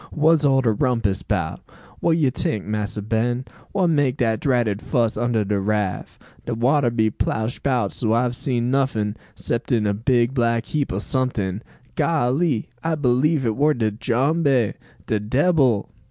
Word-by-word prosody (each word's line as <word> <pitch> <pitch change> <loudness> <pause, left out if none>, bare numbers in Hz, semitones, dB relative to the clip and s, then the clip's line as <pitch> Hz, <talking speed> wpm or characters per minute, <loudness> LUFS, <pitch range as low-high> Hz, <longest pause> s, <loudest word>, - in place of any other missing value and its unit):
"Wha's 160 0 +3
all 135 -2 +4
de 120 -3 +2
rumpus 110 -4 0
'bout? 85 -3 -2 0.4
Wha - - +1
you 160 -5 +3
tink, 110 -4 -2
Massa 105 0 -3
Ben? 120 +4 -1 0.3
Wha 195 -2 +1
make 145 -5 +2
dat 115 -4 +1
dratted 120 -7 0
fuss 115 -2 0
under 120 -3 0
de 100 0 0
raff? 105 -1 -2 0.3
De 120 - -1
water 130 +3 +2
be 110 -2 +1
plash 110 +3 -2
bout 130 -3 0
so 110 -3 -1
I've 120 +1 +1
see 130 -1 -2
nuffin, 120 -4 0 0.2
'cepting 115 -2 -1
a 100 - +1
big 120 +3 +1
black 115 -2 +1
heap 150 -3 -2
o' 95 - -2
someting. 105 -4 -2 0.3
Golly! 145 -3 +1 0.2
I 165 0 0
b'lieve 140 +1 +1
it 110 -2 0
war 150 +2 +2
de 110 -3 0
jumbe, 130 +2 +1 0.3
de 110 - 0
debbil!" 130 - +2
120 Hz, 160 wpm, -22 LUFS, 110-135 Hz, 0.4 s, all